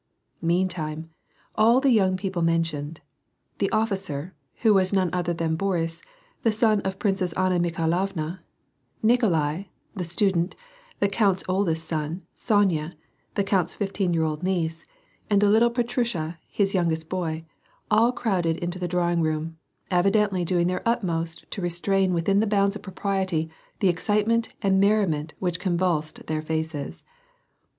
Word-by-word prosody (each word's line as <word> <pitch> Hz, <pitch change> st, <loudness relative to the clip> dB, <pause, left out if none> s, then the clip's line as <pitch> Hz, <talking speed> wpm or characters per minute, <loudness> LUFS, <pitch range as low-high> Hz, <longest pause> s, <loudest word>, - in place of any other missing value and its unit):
Meantime, 165 Hz, -2 st, -1 dB, 0.4 s
all 230 Hz, +3 st, +5 dB
the 270 Hz, -1 st, +3 dB
young 190 Hz, -5 st, +3 dB
people 185 Hz, -2 st, -3 dB
mentioned 165 Hz, -2 st, -1 dB, 0.3 s
— -, -, -48 dB
the -, -, +1 dB
officer, 190 Hz, -7 st, -2 dB, 0.3 s
who 220 Hz, -2 st, +6 dB
was 190 Hz, -2 st, +3 dB
none 190 Hz, -3 st, +2 dB
other 175 Hz, -1 st, 0 dB
than 165 Hz, -1 st, -1 dB
Boris, 165 Hz, -3 st, -1 dB, 0.4 s
the 225 Hz, -, +3 dB
son 215 Hz, -1 st, +3 dB
of 190 Hz, -, -2 dB
the -, -, -25 dB
Princess 195 Hz, -4 st, 0 dB
Anna 185 Hz, 0 st, +1 dB
Mikhailovna, 170 Hz, +1 st, -1 dB, 0.6 s
Nikolai, 190 Hz, -, +2 dB, 0.3 s
the 185 Hz, -, -2 dB
student, 175 Hz, +1 st, +1 dB, 0.4 s
the 200 Hz, -, +3 dB
count^s 195 Hz, -2 st, +1 dB
oldest 180 Hz, -4 st, 0 dB
son, 160 Hz, +3 st, -3 dB
Sonya, 180 Hz, -7 st, +1 dB, 0.4 s
the 200 Hz, -, +2 dB
count's 190 Hz, -3 st, 0 dB
fifteen 195 Hz, -2 st, -1 dB
year 165 Hz, -1 st, +2 dB
old 155 Hz, -1 st, -2 dB
niece, 165 Hz, -3 st, -1 dB, 0.4 s
and 205 Hz, -1 st, +4 dB
the 205 Hz, 0 st, +4 dB
little 225 Hz, +3 st, +5 dB
Petrusha, 235 Hz, -9 st, -1 dB
his 200 Hz, -1 st, 0 dB
youngest 165 Hz, -4 st, 0 dB
boy, 165 Hz, -3 st, -3 dB, 0.5 s
all 225 Hz, +3 st, +5 dB
crowded 180 Hz, -10 st, 0 dB
into 175 Hz, +1 st, -4 dB
the 180 Hz, -, -2 dB
drawing 175 Hz, -1 st, +1 dB
room, 160 Hz, +1 st, -2 dB, 0.3 s
evidently 195 Hz, +1 st, +2 dB
doing 175 Hz, 0 st, +1 dB
their 180 Hz, +1 st, -1 dB
utmost 170 Hz, -8 st, -1 dB
to 200 Hz, -, -4 dB
restrain 185 Hz, +2 st, +1 dB
within 180 Hz, +3 st, +2 dB
the 220 Hz, -, +2 dB
bounds 200 Hz, -1 st, +2 dB
of 210 Hz, -, -7 dB
propriety 190 Hz, -4 st, -2 dB, 0.3 s
the 195 Hz, -, +4 dB
excitement 210 Hz, +6 st, +1 dB
and 190 Hz, -1 st, +3 dB
merriment 195 Hz, -7 st, +2 dB
which 175 Hz, -2 st, -2 dB
convulsed 175 Hz, -4 st, -1 dB
their 155 Hz, 0 st, -2 dB
faces. 160 Hz, -2 st, -4 dB
180 Hz, 145 wpm, -25 LUFS, 165-200 Hz, 0.6 s, who